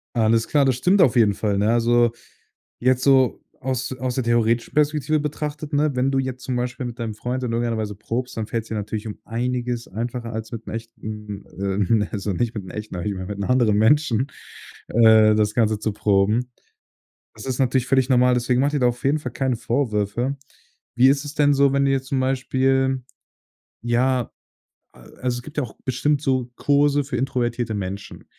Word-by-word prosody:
Alles 115 Hz, 0 st, +2 dB
klar, 145 Hz, -2 st, +3 dB
das 130 Hz, -2 st, +2 dB
stimmt 185 Hz, +10 st, +3 dB
auf 170 Hz, -, +4 dB
jeden 110 Hz, -4 st, +4 dB
Fall, 100 Hz, -1 st, -1 dB
ne? 105 Hz, +2 st, +2 dB
Also, 120 Hz, 0 st, +3 dB, 0.7 s
jetzt 130 Hz, +1 st, +2 dB
so 135 Hz, -3 st, +4 dB, 0.2 s
aus 130 Hz, 0 st, -2 dB
aus 130 Hz, -1 st, -2 dB
der 130 Hz, -, 0 dB
theoretischen 115 Hz, 0 st, +1 dB
Perspektive 150 Hz, 0 st, +1 dB
betrachtet, 150 Hz, +1 st, -4 dB
ne, 150 Hz, +1 st, +2 dB
wenn 130 Hz, +2 st, +1 dB
du 135 Hz, -, +1 dB
jetzt 130 Hz, -1 st, -3 dB
zum 125 Hz, -1 st, -2 dB
Beispiel 125 Hz, +1 st, -3 dB
mit 120 Hz, +1 st, -7 dB
deinem 115 Hz, -2 st, -4 dB
Freund 125 Hz, +4 st, -3 dB
in 120 Hz, -, -2 dB
irgendeiner 115 Hz, 0 st, 0 dB
Weise 105 Hz, -1 st, -3 dB
probst, 115 Hz, +5 st, -4 dB
dann 110 Hz, -, -3 dB
fällt's 115 Hz, 0 st, -4 dB
dir 110 Hz, -, -4 dB
natürlich 105 Hz, +1 st, -4 dB
um 105 Hz, -, -7 dB
einiges 120 Hz, 0 st, -2 dB
einfacher 115 Hz, +3 st, -4 dB
als 110 Hz, 0 st, -5 dB
mit 115 Hz, -1 st, -7 dB
'nem -, -, -6 dB
echten 105 Hz, -3 st, -8 dB, 0.2 s
ähm, 100 Hz, 0 st, 0 dB
ne, 105 Hz, -, -1 dB
also 100 Hz, -1 st, -2 dB
nicht 115 Hz, +5 st, -1 dB
mit 105 Hz, -3 st, -5 dB
'nem 90 Hz, -, -10 dB
echten 105 Hz, -3 st, -6 dB
aber 90 Hz, -, -4 dB
ich 100 Hz, -, -1 dB
meine, 95 Hz, -1 st, -6 dB
mit 105 Hz, 0 st, -6 dB
'nem 100 Hz, -, -2 dB
anderen 120 Hz, -5 st, +3 dB
Menschen, 130 Hz, +1 st, +3 dB, 0.6 s
äh, 110 Hz, -2 st, +6 dB
das 105 Hz, 0 st, +1 dB
Ganze 110 Hz, -2 st, +2 dB
zu 110 Hz, 0 st, -2 dB
proben. 105 Hz, +4 st, +1 dB, 0.8 s
Das 110 Hz, -, -10 dB
ist 130 Hz, -2 st, -2 dB
natürlich 130 Hz, -1 st, +1 dB
völlig 130 Hz, -1 st, +2 dB
normal, 125 Hz, -1 st, +4 dB
deswegen 125 Hz, +1 st, +1 dB
mache 140 Hz, +2 st, +1 dB
dir 150 Hz, -, +1 dB
da 125 Hz, -, +4 dB
auf 120 Hz, 0 st, -5 dB
jeden 145 Hz, +3 st, +2 dB
Fall 125 Hz, -5 st, -6 dB
keine 130 Hz, -2 st, -1 dB
Vorwürfe. 120 Hz, +1 st, -1 dB, 0.6 s
Wie 125 Hz, +2 st, +6 dB
ist 140 Hz, +1 st, +2 dB
es 145 Hz, -, -7 dB
denn 145 Hz, -2 st, +3 dB
so, 140 Hz, 0 st, +4 dB
wenn 140 Hz, -, +3 dB
du -, -, +2 dB
jetzt 135 Hz, -1 st, -1 dB
zum 135 Hz, -1 st, 0 dB
Beispiel, 130 Hz, 0 st, +1 dB, 0.8 s
ja 120 Hz, +1 st, +1 dB, 0.6 s
a -, -, -19 dB, 0.2 s
also 125 Hz, -1 st, -1 dB
es 120 Hz, -, -12 dB
gibt 150 Hz, +2 st, -12 dB
ja 150 Hz, -, +1 dB
auch 120 Hz, -, -9 dB
bestimmt 140 Hz, +3 st, 0 dB
so 130 Hz, -4 st, 0 dB
Kurse 145 Hz, 0 st, +3 dB
für 135 Hz, -2 st, -4 dB
introvertierte 120 Hz, -3 st, -1 dB
Menschen. 100 Hz, 0 st, -6 dB
120 Hz, 205 wpm, -22 LUFS, 110-135 Hz, 0.8 s, äh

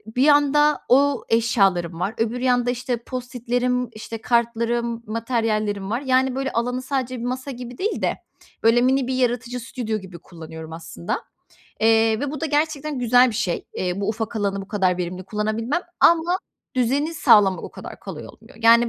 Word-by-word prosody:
bir 255 Hz, -, +3 dB
yanda 290 Hz, 0 st, +4 dB
o 275 Hz, +1 st, +4 dB
eşyalarım 195 Hz, -7 st, +2 dB
var, 195 Hz, +4 st, -1 dB
öbür 230 Hz, +2 st, -1 dB
yanda, 245 Hz, -1 st, +2 dB
işte, 245 Hz, 0 st, -2 dB
Post-it'lerim, 250 Hz, 0 st, -2 dB
işte, 220 Hz, +1 st, -7 dB
kartlarım, 235 Hz, 0 st, 0 dB
materyallerim 215 Hz, -3 st, -1 dB
var. 235 Hz, +5 st, -1 dB
Yani, 260 Hz, -1 st, +2 dB
böyle, 270 Hz, 0 st, -2 dB
alanı 245 Hz, +2 st, -1 dB
sadece 255 Hz, -2 st, -2 dB
bir -, -, -6 dB
masa 255 Hz, +2 st, -3 dB
gibi 245 Hz, -1 st, -8 dB
değil 420 Hz, +4 st, -2 dB
de, -, -, 0 dB, 0.5 s
böyle, 230 Hz, +2 st, +5 dB
mini 260 Hz, 0 st, +2 dB
bir 260 Hz, -, -1 dB
yaratıcı 245 Hz, 0 st, -1 dB
stüdyo 230 Hz, -2 st, -3 dB
gibi 185 Hz, -2 st, -11 dB
kullanıyorum, 160 Hz, -1 st, -10 dB
aslında, 125 Hz, -, -5 dB, 0.6 s
eee, 225 Hz, 0 st, +4 dB
ve 285 Hz, 0 st, -2 dB
bu 300 Hz, -, -6 dB
da 325 Hz, -, 0 dB
gerçekten 300 Hz, -1 st, -1 dB
güzel 245 Hz, +1 st, +5 dB
bir -, -, -7 dB
şey. 200 Hz, -7 st, -1 dB
Eee, 180 Hz, +1 st, -2 dB
bu 200 Hz, -, -1 dB
ufak 225 Hz, +1 st, -3 dB
alanı 200 Hz, -2 st, -1 dB
bu 195 Hz, -, -12 dB
kadar 185 Hz, -4 st, +1 dB
verimli 180 Hz, +1 st, -4 dB
kullanabilmem 220 Hz, -, -1 dB, 0.2 s
ama 340 Hz, +2 st, +4 dB, 0.4 s
düzeni 275 Hz, +6 st, +1 dB
sağlamak 200 Hz, -, +5 dB
o -, -, -7 dB
kadar -, -, -10 dB
kolay -, -, -8 dB
olmuyor. -, -, -17 dB
Yani, 235 Hz, +1 st, +6 dB
235 Hz, 170 wpm, -23 LUFS, 215-255 Hz, 0.6 s, Yani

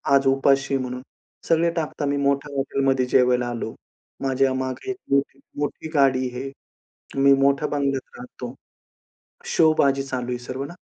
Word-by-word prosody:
आज 135 Hz, 0 st, +3 dB
उपाशी 135 Hz, 0 st, +3 dB
म्हणून. 125 Hz, -1 st, -4 dB, 0.5 s
सगळे 165 Hz, +1 st, +3 dB
टाकतात 155 Hz, -3 st, -3 dB
मी 140 Hz, 0 st, 0 dB
मोठ्या 140 Hz, +1 st, 0 dB
हॉटेलमध्ये 135 Hz, -1 st, +1 dB
जेवायला 125 Hz, -1 st, +3 dB
आलो. 115 Hz, -2 st, -4 dB, 0.5 s
माझ्यामागे 130 Hz, -, 0 dB
एक 385 Hz, -, -6 dB
मोठी-मोठी 140 Hz, +2 st, -2 dB
गाडी 130 Hz, -3 st, +3 dB
आहे. 135 Hz, +2 st, -5 dB, 0.7 s
मी 140 Hz, 0 st, +7 dB
मोठ्या 140 Hz, +2 st, +3 dB
बंगल्यात 140 Hz, -2 st, -2 dB
राहतो. 125 Hz, 0 st, -8 dB, 0.9 s
शोबाजी 140 Hz, -4 st, +3 dB
चालू 130 Hz, -2 st, -4 dB
आहे 125 Hz, -, -1 dB
सर्व 130 Hz, +2 st, -5 dB
ना. 170 Hz, -, -9 dB
135 Hz, 135 wpm, -23 LUFS, 130-140 Hz, 0.9 s, मी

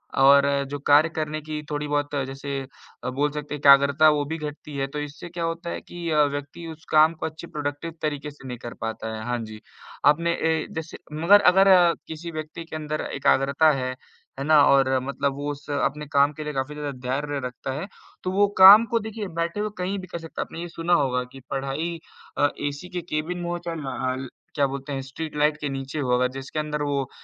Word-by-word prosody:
और 140 Hz, +1 st, +6 dB, 0.2 s
जो 145 Hz, -, -3 dB
कार्य 150 Hz, +3 st, +6 dB
करने 155 Hz, -1 st, -3 dB
की 155 Hz, 0 st, -5 dB
थोड़ी-बहुत 145 Hz, 0 st, -1 dB, 0.2 s
जैसे 135 Hz, +1 st, -4 dB, 0.4 s
अ, -, -, -2 dB
बोल 145 Hz, +3 st, 0 dB
सकते 150 Hz, 0 st, -6 dB
हैं -, -, -7 dB
एकाग्रता 140 Hz, +2 st, +6 dB
वो 150 Hz, -1 st, +2 dB
भी 160 Hz, +3 st, -4 dB
घटती 150 Hz, -1 st, -7 dB
है, 135 Hz, 0 st, -1 dB
तो 150 Hz, +2 st, -5 dB
इससे 150 Hz, +4 st, -7 dB
क्या 170 Hz, 0 st, -5 dB
होता 165 Hz, +1 st, -3 dB
है -, -, -4 dB
कि 175 Hz, -1 st, -6 dB
अ, 150 Hz, -1 st, +5 dB
व्यक्ति 145 Hz, +3 st, -4 dB
उस 160 Hz, 0 st, -13 dB
काम 155 Hz, +1 st, +6 dB
को 160 Hz, -, -5 dB
अच्छे 160 Hz, +2 st, -7 dB
प्रोडक्टिव 150 Hz, +2 st, -4 dB
तरीके 150 Hz, -1 st, -3 dB
से 140 Hz, -2 st, -13 dB
नहीं 125 Hz, -, -5 dB
कर 120 Hz, 0 st, -8 dB
पाता 110 Hz, 0 st, -4 dB
है। 110 Hz, -, -6 dB
हाँ 120 Hz, 0 st, -1 dB
जी, 110 Hz, -1 st, -10 dB, 0.4 s
आपने 170 Hz, +4 st, +4 dB
ए 160 Hz, -1 st, 0 dB
जैसे 160 Hz, 0 st, -5 dB, 0.3 s
मगर 205 Hz, +4 st, +7 dB
अगर 195 Hz, +1 st, +5 dB, 0.4 s
किसी 165 Hz, +2 st, -7 dB
व्यक्ति 155 Hz, +1 st, -6 dB
के 160 Hz, -, -8 dB
अंदर 155 Hz, 0 st, -3 dB
एकाग्रता 140 Hz, +2 st, +3 dB
है, 130 Hz, -3 st, -2 dB, 0.5 s
है 135 Hz, -, -2 dB
ना 155 Hz, -1 st, +6 dB
और 130 Hz, -1 st, +4 dB
मतलब 140 Hz, +1 st, -1 dB
वो 145 Hz, +1 st, -3 dB
उस 145 Hz, +1 st, -10 dB
अपने 145 Hz, +1 st, -1 dB
काम 140 Hz, +1 st, +5 dB
के 155 Hz, +1 st, -7 dB
लिए 150 Hz, -, -4 dB
काफ़ी 135 Hz, +2 st, -3 dB
ज़्यादा 150 Hz, -1 st, -4 dB, 0.2 s
धैर्य 145 Hz, +2 st, -1 dB
रखता 125 Hz, +2 st, -6 dB
है, 155 Hz, +8 st, -4 dB, 0.4 s
तो 185 Hz, -, -1 dB
वो 200 Hz, +2 st, +4 dB
काम 200 Hz, +4 st, +10 dB
को 230 Hz, -, +3 dB
देखिए 220 Hz, -1 st, -5 dB
बैठे 170 Hz, +4 st, -1 dB
हुए 210 Hz, 0 st, -1 dB
कहीं 190 Hz, +2 st, -2 dB
भी 185 Hz, -, -9 dB
कर 170 Hz, -, -6 dB
सकता 165 Hz, -1 st, -6 dB
है। -, -, -2 dB
आपने 165 Hz, -, -8 dB
ये 175 Hz, -, -5 dB
सुना 170 Hz, +1 st, -1 dB
होगा 125 Hz, -5 st, +2 dB
कि 135 Hz, -, -10 dB
पढ़ाई 140 Hz, +5 st, -3 dB, 0.4 s
अ, 145 Hz, -, +4 dB, 0.2 s
ऐसी 145 Hz, +5 st, -9 dB
के -, -, -1 dB
केबिन 165 Hz, +1 st, -3 dB
में 175 Hz, 0 st, -4 dB
हो 175 Hz, -, -1 dB
चाहे 165 Hz, -1 st, -3 dB
न -, -, -7 dB, 0.2 s
हल, 130 Hz, 0 st, -2 dB, 0.3 s
क्या 145 Hz, -, +3 dB
बोलते 140 Hz, +1 st, -5 dB
हैं 135 Hz, -, -2 dB
स्ट्रीट 150 Hz, +4 st, -7 dB
लाइट 150 Hz, +1 st, +2 dB
के 145 Hz, -, -2 dB
नीचे 135 Hz, +2 st, -4 dB
हो 130 Hz, -3 st, -1 dB
अगर 125 Hz, +1 st, +2 dB
जिसके 135 Hz, +3 st, -5 dB
अंदर 150 Hz, -1 st, -2 dB
वो 140 Hz, -2 st, -1 dB
150 Hz, 225 wpm, -24 LUFS, 140-165 Hz, 0.5 s, काम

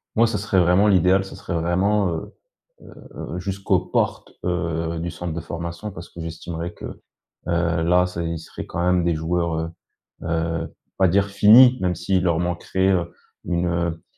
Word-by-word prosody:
Moi 115 Hz, +1 st, +5 dB
ce 110 Hz, -2 st, -1 dB
serait 100 Hz, -1 st, +1 dB
vraiment 90 Hz, +4 st, +4 dB
l'idéal, 95 Hz, 0 st, +4 dB
ce 95 Hz, -, -10 dB
serait -, -, -6 dB
vraiment, 95 Hz, +5 st, +1 dB
heu, 80 Hz, -1 st, -5 dB, 0.5 s
heu, -, -, -9 dB
jusqu'aux 95 Hz, +2 st, 0 dB
portes, -, -, -2 dB
heu, 85 Hz, -1 st, -2 dB
du 85 Hz, +1 st, -3 dB
centre 85 Hz, -1 st, -5 dB
de 85 Hz, -, -3 dB
formation. 85 Hz, +5 st, -6 dB
Parce 85 Hz, -2 st, -10 dB
que 85 Hz, -, -11 dB
j'estimerais 85 Hz, +1 st, -5 dB
que, -, -, -13 dB, 0.6 s
heu, 85 Hz, -1 st, +1 dB
là 90 Hz, +2 st, +3 dB
ç'est 85 Hz, -2 st, -4 dB
ils 85 Hz, 0 st, -3 dB
seraient 80 Hz, -, -9 dB
quand 85 Hz, -, -3 dB
même 90 Hz, -1 st, +2 dB
des 85 Hz, -1 st, +2 dB
joueurs, 85 Hz, +1 st, -1 dB
heu, 80 Hz, 0 st, -3 dB, 0.5 s
heu, 80 Hz, 0 st, -2 dB, 0.2 s
pas 95 Hz, -, +4 dB
dire 100 Hz, +3 st, +3 dB
finis. 115 Hz, +6 st, +7 dB
Même 90 Hz, -1 st, 0 dB
s'ils 95 Hz, +2 st, 0 dB
leur 85 Hz, -2 st, +1 dB
manqueraient 90 Hz, +2 st, 0 dB, 0.5 s
une, 85 Hz, 0 st, 0 dB
heu, 85 Hz, -1 st, -2 dB
85 Hz, 175 wpm, -22 LUFS, 85-95 Hz, 0.6 s, finis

